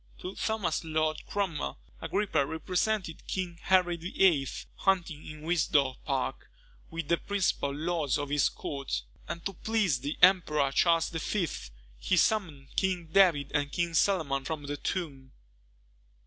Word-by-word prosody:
To 185 - -4
Thomas 215 -9 -1
Lord 155 -1 -1
Cromwell, 170 - -2 0.2
Agrippa 190 -1 +1
represented 180 +4 -2
King 175 -3 -3
Henry 180 -2 +3
VIII. 170 -4 +2 0.3
hunting 175 -6 0
in 155 0 -9
Windsor 150 -5 +2
Park, - - -2 0.4
with 165 -2 -5
the 170 - +3
principal 190 -8 0
lords 155 -1 0
of 145 -1 -3
his 145 -1 +3
court; 140 - -4 0.2
and 170 - -6
to 195 - -2
please 200 - +1
the 145 +4 -4
Emperor 155 -7 +5
Charles 165 +3 +3
V. 170 +3 -1 0.5
he 185 - +1
summoned 160 -11 0
King 180 -4 0
David 165 -7 +4
and 145 -1 0
King 170 +1 -1
Solomon 155 -7 +2
from 155 0 -4
the 145 0 -3
tomb. 140 -9 -4
165 Hz, 135 wpm, -29 LUFS, 145-185 Hz, 0.5 s, Emperor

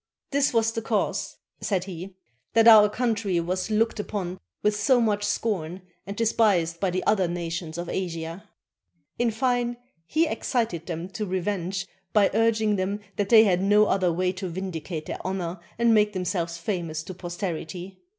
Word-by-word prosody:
"This 280 0 +2
was 225 -1 +2
the 225 - -3
cause," - - -1 0.2
said 190 -4 0
he, 185 0 -8 0.4
"that 225 0 +6
our 215 -2 +9
country 215 -5 0
was 185 +4 -2
looked 220 +1 +1
upon 190 -3 -4 0.2
with 210 0 +3
so 245 +5 +3
much 210 -3 +1
scorn, 185 -6 -2 0.2
and 200 - -6
despised 200 -7 +2
by 195 - +1
the 185 +1 -2
other 195 -4 +3
nations 170 -1 -4
of 175 0 -4
Asia." 170 +2 -4 0.7
In 240 -1 +3
fine, 240 +1 0 0.3
he 320 - +2
excited 225 - -2
them 170 0 -4
to 210 +2 -4
revenge 190 0 -2 0.3
by 205 -2 +4
urging 220 -1 +2
that 200 +1 -3
they 225 -2 +8
had 185 -4 +2
no 205 +2 +5
other 185 -3 +2
way 180 +2 0
to 185 0 -5
vindicate 165 -3 -5
their - - -5
honor 185 -2 -3 0.2
and 235 0 +4
make 210 -1 +3
themselves 175 -2 -2
famous 165 -4 -3
to 185 - -7
posterity. 180 +1 -5
195 Hz, 160 wpm, -26 LUFS, 175-215 Hz, 0.7 s, our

